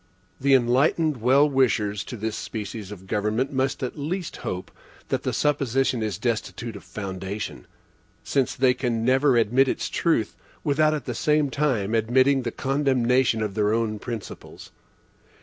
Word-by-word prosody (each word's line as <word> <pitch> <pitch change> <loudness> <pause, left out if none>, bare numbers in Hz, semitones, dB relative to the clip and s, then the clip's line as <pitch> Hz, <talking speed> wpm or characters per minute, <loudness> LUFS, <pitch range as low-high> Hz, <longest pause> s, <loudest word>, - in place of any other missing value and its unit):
The 135 0 +4
enlightened 135 +5 +2
well 135 +5 +5
wishers 110 -7 +1
to 120 - -7
this 110 +1 -3
species 105 -1 -6
of 95 -2 -10
government 105 +7 -1
must 135 0 -1
at 130 +4 -4
least 170 +4 -3
hope 90 0 -5 0.4
that - - 0
the - - -2
supposition 135 -4 +1
is 105 -5 -2
destitute 115 -1 -3
of 100 - -10
foundation; 95 - -6 0.6
since 135 -3 0
they 130 0 +4
can 120 -3 -2
never 130 0 +4
admit 120 +4 +3
its - - -2
truth, 115 - 0 0.3
without 155 +1 +2
at 145 - -5
the 125 - -3
same 150 +4 +1
time 125 -9 0
admitting 130 +5 +3
the 120 -2 -3
condemnation 130 -4 +1
of 105 -2 -3
their 105 0 +1
own 110 -2 -1
principles. 115 -2 -8
125 Hz, 150 wpm, -24 LUFS, 110-135 Hz, 0.6 s, well